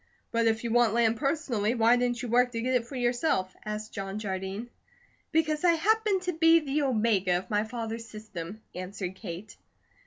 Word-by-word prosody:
"But 230 0 +2
if 220 0 +1
you 235 - -2
want 235 -2 +4
land 230 -1 +3
personally, 270 -7 0
why 230 +1 +5
didn't 245 0 0
you - - -3
work 245 +1 +3
to 230 - -2
get 255 +2 0
it 240 -2 +1
for 275 - -8
yourself?" 240 - 0
asked 215 +1 -5
John 195 -1 -4
Jardine. 195 +2 -4 0.6
"Because 310 -1 +1
I 345 -1 +6
happened 410 +2 +2
to 360 -1 -1
be 325 +1 +6
the 300 -1 -1
omega 215 -8 +2
of 190 +6 -7
my 210 +1 +2
father's 230 0 -5
system," 210 -2 -8
answered 185 0 -5
Kate. 190 +1 -8
230 Hz, 185 wpm, -28 LUFS, 210-265 Hz, 0.6 s, I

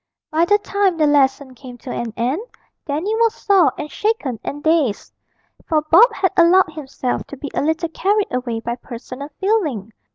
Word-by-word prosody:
By 320 +2 +3
the 410 +3 +4
time 400 -3 0
the 310 - +3
lesson 280 -2 +2
came 250 -1 -11
to 250 +1 -8
an 235 -1 -4
end, 255 - -1 0.5
Dandy 315 +9 -1
was 460 -1 +2
sore 390 -5 +3
and 300 0 -6
shaken 360 - -1
and 290 +1 -6
dazed, 315 -9 +1 0.5
for 310 -2 +1
Bob 445 +9 +7
had 375 - 0
allowed 345 -1 +4
himself 270 -4 -4
to 280 - -9
be 285 +1 -7
a - - 0
little 320 +3 -1
carried 405 +3 0
away 240 -3 -2
by 235 +1 -4
personal 255 +4 -9
feeling. 310 - -1
305 Hz, 175 wpm, -19 LUFS, 255-375 Hz, 0.5 s, Bob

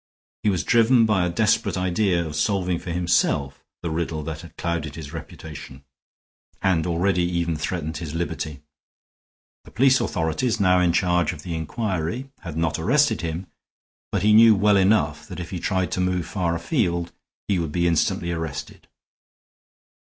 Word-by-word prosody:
He 105 - +2
was 95 -4 0
driven 115 0 +4
by 105 -4 +2
a 90 - 0
desperate 105 +1 +1
idea 90 -1 +1
of 75 -1 -6
solving 90 +2 0
for - - -8
himself 85 -5 0 0.2
the 85 - -2
riddle 80 -1 -2
that 80 +1 -5
had 85 - -14
clouded 80 -4 -3
his 80 -2 -8
reputation 75 -4 -9 0.8
and 90 -3 +1
already 90 +2 +1
even 85 -1 0
threatened 80 0 -3
his 80 -2 -6
liberty. 80 -3 -4 1.0
The - - -15
police 130 +2 +3
authorities, 85 +6 -1
now 90 -2 +4
in 90 -1 +3
charge 90 -1 +1
of 75 -3 -11
the 85 - -4
inquiry, 95 - -3
had 85 -5 -7
not 80 -1 0
arrested 120 - +2
him, 85 +2 -4 0.7
but - - -1
he 105 0 +5
knew 110 0 +8
well 105 +1 +4
enough 80 -6 +2
that - - -8
if 85 - -6
he 90 - -3
tried 95 +1 -1
to 90 - -1
move 90 -2 0
far 85 -4 -1
afield 85 - -1 0.4
he 100 -3 +1
would 80 -3 -2
be 85 +2 0
instantly 85 +1 +1
arrested. 80 -4 -5
85 Hz, 165 wpm, -23 LUFS, 80-100 Hz, 1.0 s, knew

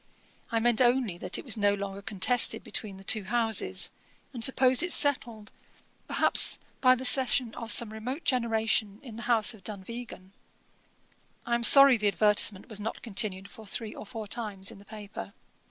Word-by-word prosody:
I 230 - -1
meant 235 +1 +1
only 240 -7 0
that - - -3
it - - -9
was 225 -4 -1
no 205 0 +1
longer 200 0 -7
contested 210 +4 +1
between 200 -3 -5
the 195 - -14
two 205 +1 +2
houses, 225 0 0 0.4
and 235 -3 -4
supposed 255 0 +3
it 355 0 -2
settled, 235 -9 +1 0.6
perhaps, - - +5 0.2
by 255 -1 +4
the 255 +1 -8
cession 255 -2 +2
of 230 -2 -5
some 220 0 +4
remote 250 +8 -7
generation, 225 -4 -1
in 240 -5 -11
the 230 - -9
house 230 -1 +4
of 210 -4 -18
Dunvegan. 210 -1 -9 1.1
I 235 - -3
am 235 0 -1
sorry 275 0 +6
the 210 -1 -1
advertisement 205 -1 +1
was 215 -4 -6
not 220 +2 -7
continued 200 -3 -3
for 220 0 -15
three 220 +1 -6
or - - -11
four 220 -1 -8
times 200 -3 -4
in - - -14
the 200 - -18
paper. 205 - -10
220 Hz, 175 wpm, -27 LUFS, 205-240 Hz, 1.1 s, sorry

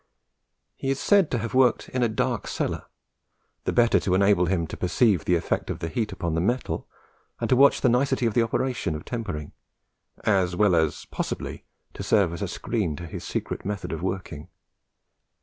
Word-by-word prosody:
He 135 - -4
is 135 0 0
said 200 -5 +4
to 125 - 0
have 115 0 -4
worked 130 -1 +3
in 130 - -2
a 120 - +3
dark 110 - -1
cellar, - - -2 0.8
the - - +1
better 120 -1 +4
to 90 - 0
enable 100 -2 +4
him 90 -3 +1
to - - -7
perceive 95 -1 +2
the 90 - +3
effect 85 - -1
of - - -2
the 80 - -4
heat 105 +5 -2
upon 85 -3 -3
the 80 - +1
metal, 120 +7 -1 0.5
and - - -1
to - - +6
watch 140 +2 +5
the - - +4
nicety 130 +1 +2
of 115 - +1
the 120 - +3
operation 115 -6 -1
of 75 - -7
tempering, 90 - -4 0.7
as 95 -4 +2
well 105 0 +4
as 80 -2 0
possibly - - -4 0.3
to - - -7
serve 100 -6 +2
as 85 - -6
a - - -1
screen 100 -10 -2
to 85 - -7
his 80 - -7
secret - - -4
method 100 0 -4
of 80 - -4
working. 90 -5 -4
100 Hz, 195 wpm, -25 LUFS, 85-120 Hz, 0.8 s, to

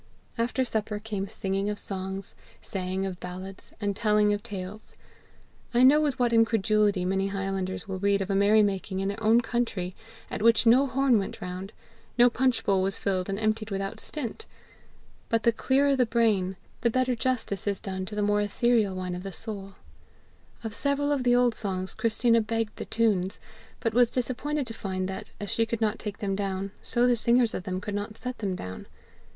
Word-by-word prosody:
After 245 +2 0
supper 215 -2 -2
came 205 -2 -4
singing 195 +1 -2
of 210 - -2
songs, 190 0 -5 0.3
saying 190 0 -3
of 185 -2 -5
ballads, 185 +2 -8
and 205 -2 -1
telling 210 -1 +3
of 205 - -2
tales. 200 +1 -7 0.8
I 245 - +6
know 290 +4 +7
with 290 -3 0
what 240 -2 +2
incredulity 215 -4 +3
many 195 +1 +1
highlanders 195 0 -3
will 190 -1 -4
read 200 0 +2
of 195 0 -2
a - - +1
merry 205 +2 +5
making 195 -1 -1
in 195 0 0
their 205 +2 -5
own 225 +2 +5
country 225 -7 -2 0.4
at - - -3
which 230 +1 +5
no 255 +5 +6
horn 260 -3 +3
went 195 - -5
round, 185 +2 -6 0.5
no 245 0 +6
punch 255 0 +1
bowl 195 -2 +3
was 195 +1 -1
filled 185 -1 -1
and 195 - -1
emptied 215 0 0
without 195 +2 -3
stint! 300 - -5 0.8
But 230 -1 +1
the 235 - +5
clearer 275 +4 +2
the 250 -2 +2
brain, 210 -5 +2 0.2
the 235 - +3
better 255 +1 +1
justice 235 -5 -2
is 200 -2 0
done 190 -2 -4
to 210 - -6
the 210 - 0
more 205 0 +2
etherial 215 -1 +2
wine 185 -1 -3
of 180 - -5
the 195 +1 -6
soul. 195 0 -6 0.9
Of 220 -2 -4
several 280 +4 0
of 285 -2 +1
the 245 -1 +4
old 245 -1 +4
songs 190 -3 -3
Christina 230 +1 +2
begged 225 0 -2
the - - -5
tunes, 200 -5 +1 0.4
but 230 - -1
was 245 0 +5
disappointed 265 +4 -1
to 230 - -6
find 185 -4 -3
that, 190 0 -6
as 205 -1 -4
she 225 0 +2
could 230 0 -2
not 215 -1 0
take 205 -2 -5
them 195 -2 -2
down, 195 0 -2
so 240 0 +1
the 245 -1 +4
singers 235 0 +3
of 180 - -4
them 185 -1 -2
could 205 +1 -5
not 205 +1 -4
set 250 0 -5
them 195 -4 -1
down. 95 - -7
210 Hz, 195 wpm, -27 LUFS, 195-235 Hz, 0.9 s, know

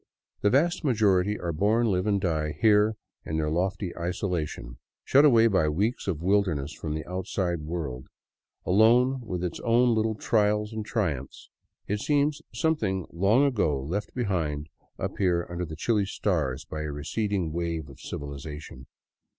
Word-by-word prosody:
The 105 - +4
vast 165 +10 +2
majority 105 -6 +2
are 85 -1 -3
born, 105 +8 +2
live, 95 -3 +1
and 100 -1 +2
die 75 -5 -1
here 105 0 +4 0.3
in 80 - -3
their 75 -1 0
lofty 90 +2 -1
isolation. 85 - -3 0.3
Shut 140 +3 +6
away 115 -6 +6
by 95 -8 +3
weeks 100 +12 -1
of 85 -4 -2
wilderness 90 -7 +1
from 80 -1 -4
the 80 - -4
outside 90 -1 -2
world, 75 -6 -5 0.6
alone 120 +7 +4
with 90 -6 -4
its 90 -2 -3
own 120 +1 +3
little 110 0 +1
trials 105 0 +1
and 110 -1 -3
triumphs, 80 - -3 0.4
it 105 +1 -1
seems 145 +4 +1
something 110 - 0
long 100 +10 +3
ago 100 - +1
left 90 +10 -4
behind 80 - -1 0.3
up - - -4
here 90 -3 +2
under 90 0 -3
the 80 -1 -7
chilly 105 +4 +1
stars 80 -10 -1
by 75 - -5
a 75 -1 -3
receding 85 +3 -2
wave 85 -2 -2
of 70 - -14
civilization. 70 -2 -7
95 Hz, 155 wpm, -27 LUFS, 80-110 Hz, 0.6 s, Shut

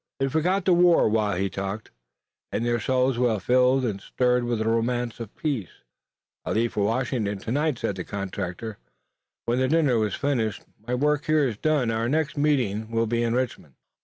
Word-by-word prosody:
They 135 - +1
forgot 175 +6 +1
the 185 - +5
war 175 -1 +5
while 105 -3 +1
he 95 +1 0
talked, 100 +3 -5 0.6
and 115 - -1
their 120 0 +1
souls 130 +1 +1
were 120 -4 +2
filled 125 +5 +3
and 100 -4 -3
stirred 125 +1 +1
with 120 -1 0
the 110 - -2
romance 120 +1 0
of 115 -3 -8
peace. 135 - -2 0.7
"I - - -2
leave 115 +1 0
for 105 - 0
Washington 115 -3 -1
tonight," 140 +7 -1
said 100 - -3
the 90 - -3
contractor, 100 +2 -5 0.7
when 120 +2 +1
the 130 - +2
dinner 145 -6 +3
was 105 -2 0
finished. 120 -7 -1 0.2
"My 125 - 0
work 150 +3 +1
here 155 -3 +3
is 110 -4 -4
done. 145 -4 +1
Our 115 +1 -1
next 155 +1 0
meeting 125 -8 0
will 115 0 +1
be 115 +1 0
in 115 0 0
Richmond." 120 - -3
120 Hz, 190 wpm, -25 LUFS, 110-135 Hz, 0.7 s, the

